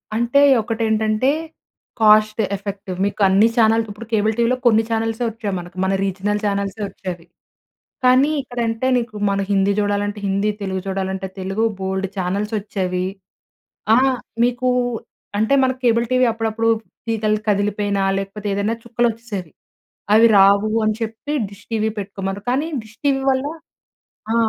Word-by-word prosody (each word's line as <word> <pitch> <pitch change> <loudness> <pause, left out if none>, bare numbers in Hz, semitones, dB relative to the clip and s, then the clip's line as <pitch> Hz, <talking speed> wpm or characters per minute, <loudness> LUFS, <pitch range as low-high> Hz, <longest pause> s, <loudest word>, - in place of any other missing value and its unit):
అంటే 235 +5 +3 0.2
ఒకటి 225 +1 -4
ఏంటంటే, 220 +3 +1 0.7
కాస్ట్ 215 0 +5 0.2
ఎఫెక్టివ్ 195 -1 -6
మీకు 205 +1 -3
అన్ని 195 +4 +5
ఛానల్ 225 0 +4
ఇప్పుడు 210 +3 -8
కేబుల్ 215 0 +2
టీవీలో 235 +2 +2
కొన్ని 225 -2 +5
ఛానెల్సే 225 +1 -1
వచ్చేయి 220 -2 -4
మనకు. 175 0 -10
మన 190 - +1
రీజనల్ 200 +2 -1
ఛానల్స్ 200 0 -1
వచ్చేవి. 180 -3 -7 0.8
కానీ 255 +4 +5
ఇక్కడ 245 -2 -10
అంటే 225 +3 -2
నీకు 235 -3 -5
మన 200 0 0
హిందీ 200 0 +3
చూడాలంటే 205 0 -1
హిందీ, 200 +2 +1
తెలుగు 190 -1 -2
చూడాలంటే 190 0 -3
తెలుగు, 195 +4 -1
బోలెడు 190 0 -2
ఛానల్స్ 195 +4 -2
వచ్చేవి. 185 -3 -2 0.9
ఆ! - - +5 0.5
మీకు 245 +1 +1 0.7
అంటే 220 +5 +2
మనకు 260 0 0
కేబుల్ 235 0 +3
టీవీ 255 0 +4
అప్పుడప్పుడు 225 0 -1 0.4
తీగలు 215 -1 0
కదిలిపోయినా 205 0 0 0.2
లేకపోతే, 195 +2 -5
ఏదైనా 200 +3 0
చుక్కలు 235 0 +1
వచ్చేసేవి. 215 -7 -7 0.6
అవి 225 +2 +7
రావు 200 +2 +5 0.2
అని 215 0 +1
చెప్పి 225 +5 -4 0.2
డిష్ 200 0 -15
టీవీ 220 -1 +1
పెట్టుకోమన్నారు. 195 0 -5
కానీ 275 +5 0 0.2
డిష్ 220 +1 -18
టీవీ 275 -1 +2
వల్ల 260 +1 0 0.9
ఆ! - - +1
215 Hz, 140 wpm, -20 LUFS, 195-225 Hz, 0.9 s, అవి